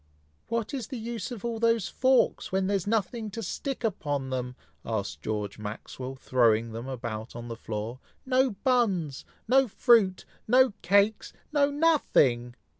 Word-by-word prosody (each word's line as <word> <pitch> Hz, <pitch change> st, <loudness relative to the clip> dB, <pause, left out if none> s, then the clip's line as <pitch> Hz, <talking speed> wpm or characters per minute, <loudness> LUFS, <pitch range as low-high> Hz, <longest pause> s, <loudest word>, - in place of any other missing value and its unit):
"What 230 Hz, +1 st, -2 dB
is 260 Hz, -5 st, -3 dB
the 260 Hz, -, -6 dB
use 230 Hz, 0 st, -4 dB
of 235 Hz, -3 st, -7 dB
all 230 Hz, -1 st, -2 dB
those 230 Hz, -3 st, +2 dB
forks, 260 Hz, -1 st, +2 dB
when 190 Hz, 0 st, +1 dB
there 200 Hz, +1 st, +1 dB
is 195 Hz, -1 st, -2 dB
nothing 220 Hz, +1 st, -1 dB
to 225 Hz, +3 st, -6 dB
stick 265 Hz, +7 st, -4 dB
upon 145 Hz, -, -2 dB
them?" 125 Hz, -1 st, -3 dB, 0.3 s
asked 100 Hz, -11 st, -3 dB
George 105 Hz, 0 st, -3 dB
Maxwell, 120 Hz, +5 st, -6 dB
throwing 115 Hz, -3 st, +2 dB
them 115 Hz, +3 st, -6 dB
about 115 Hz, -3 st, -5 dB
on 120 Hz, 0 st, -7 dB
the 115 Hz, -, -4 dB
floor. 115 Hz, +2 st, -5 dB, 0.3 s
"No 260 Hz, 0 st, +3 dB
buns! 200 Hz, -, +1 dB, 0.2 s
no 265 Hz, +2 st, +5 dB
fruit! 210 Hz, -4 st, +3 dB, 0.2 s
no 255 Hz, 0 st, +5 dB
cakes! 200 Hz, +3 st, +2 dB, 0.2 s
no 285 Hz, -1 st, +4 dB
nothing!" 150 Hz, -, +2 dB
190 Hz, 155 wpm, -28 LUFS, -, 0.3 s, no